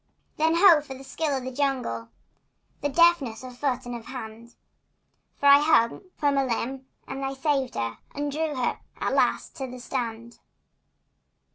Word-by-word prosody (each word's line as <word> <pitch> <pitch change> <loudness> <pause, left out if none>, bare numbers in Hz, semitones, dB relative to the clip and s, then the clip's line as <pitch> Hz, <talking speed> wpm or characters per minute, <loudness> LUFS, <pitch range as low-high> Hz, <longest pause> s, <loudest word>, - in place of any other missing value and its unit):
Then, 320 +2 +3
ho, 340 -3 +7
for 275 -2 -9
the 265 - -11
skill 285 +1 -2
of 260 - -5
the 260 - -5
jungle! 250 - -2 0.7
The 290 - 0
deftness 285 -7 +3
of 255 -1 -9
foot 255 -1 -1
and 245 - -5
of 230 -1 -9
hand! 235 -2 -9 0.8
For - - -4
I 280 0 +9
hung 295 0 +3
from 285 -2 +2
a - - +3
limb 260 +2 -3 0.2
and 270 +1 -5
I 270 0 -2
saved 270 -2 0
her 115 -1 -3 0.2
And 290 0 -2
drew 310 0 -2
her 255 -2 -1 0.2
at - - -1
last - - +1
to 265 - -4
the 250 0 -8
strand. 235 -2 -5
265 Hz, 170 wpm, -26 LUFS, 245-290 Hz, 0.8 s, I